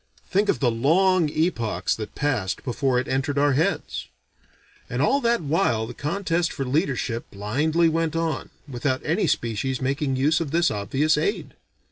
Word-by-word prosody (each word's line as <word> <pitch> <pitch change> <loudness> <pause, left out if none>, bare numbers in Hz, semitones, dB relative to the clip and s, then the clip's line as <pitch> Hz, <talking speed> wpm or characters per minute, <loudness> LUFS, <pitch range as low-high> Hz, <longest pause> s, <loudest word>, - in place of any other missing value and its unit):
Think 205 +2 +2
of - - +2
the 125 -4 +2
long 165 +8 +3
epochs 145 - 0
that 110 -1 -7
passed 125 -10 -1
before 130 0 0
it 125 - -3
entered 135 +2 -1
our 145 0 +3
heads. 165 +9 -1 0.8
And - - -3
all 280 - +3
that 235 -3 +2
while 145 - +1
the 120 - -8
contest 170 +4 -1
for 135 - -4
leadership 130 -4 -1
blindly 145 +12 +1
went 165 -1 0
on, 165 -1 -2 0.2
without 130 0 -2
any - - +1
species 120 +3 -1
making 135 +1 -1
use 150 +5 +2
of 160 - -2
this 170 +3 +2
obvious 135 - +1
aid. 405 - -2
145 Hz, 160 wpm, -24 LUFS, 125-165 Hz, 0.8 s, long